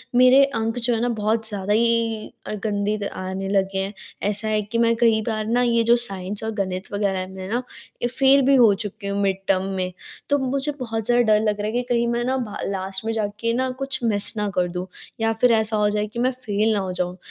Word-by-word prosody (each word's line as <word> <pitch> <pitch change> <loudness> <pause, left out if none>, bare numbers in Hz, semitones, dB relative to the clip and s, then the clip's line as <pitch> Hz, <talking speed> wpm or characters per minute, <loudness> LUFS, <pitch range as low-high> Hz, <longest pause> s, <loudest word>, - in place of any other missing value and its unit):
मेरे 255 +2 +7
अंक 225 -3 -2
जो 240 0 0
है 225 - -2
ना 245 - +1
बहुत 220 +2 +1
ज़्यादा 205 0 -1
ही 230 -1 +1 0.2
अ, - - -3
गंदी 210 0 0
त - - -2 0.2
आने 190 +1 -4
लगे 195 -1 +1
हैं। 195 +2 -3 0.4
ऐसा 210 +1 -2
है 215 0 +1
कि 210 +3 -4
मैं 230 0 +3
कई 225 -2 +3
बार 215 -1 -1
ना 240 +2 +2
ये 235 -1 +3
जो 235 +1 +5
साइंस 195 +2 -5
और 220 - -2
गणित 185 0 -6
वगैरह 195 -2 -1
में 190 -1 -7
ना 240 +3 -1 0.4
ये 240 - +1
फेल 270 +2 +4
भी 275 +1 +5
हो 230 -5 +6
चुकी 205 +1 -6
हूँ 200 0 -1
मिड 195 -1 +1
टर्म 190 -1 +2
में। 185 -1 -2 0.4
तो 285 - +4
मुझे 275 +2 -1
बहुत 225 -3 -3
ज़्यादा 245 0 +4
डर 210 - +4
लग 210 -1 0
रहा 210 - -2
है 215 - -2
कि 245 - +1
कहीं 235 -1 +2
मैं 235 0 0
ना 260 +1 0
भा 230 -5 -4
लास्ट 190 +1 -4
में 225 - 0
जाके 220 +1 -2
ना 260 +2 0
कुछ 270 0 -1
मिस 205 -3 +2
ना 210 -1 0
कर 180 -1 +2
दूँ 180 0 -4 0.4
या 225 0 +2
फिर 250 - +6
ऐसा 220 -1 +2
हो 210 0 +3
जाए 210 0 -1
कि 215 +3 -7
मैं 255 +2 +2
फेल 215 -1 +1
ना 210 - +1
हो 190 -1 -3
जाऊँ। 180 0 -3
220 Hz, 245 wpm, -23 LUFS, 200-235 Hz, 0.4 s, मेरे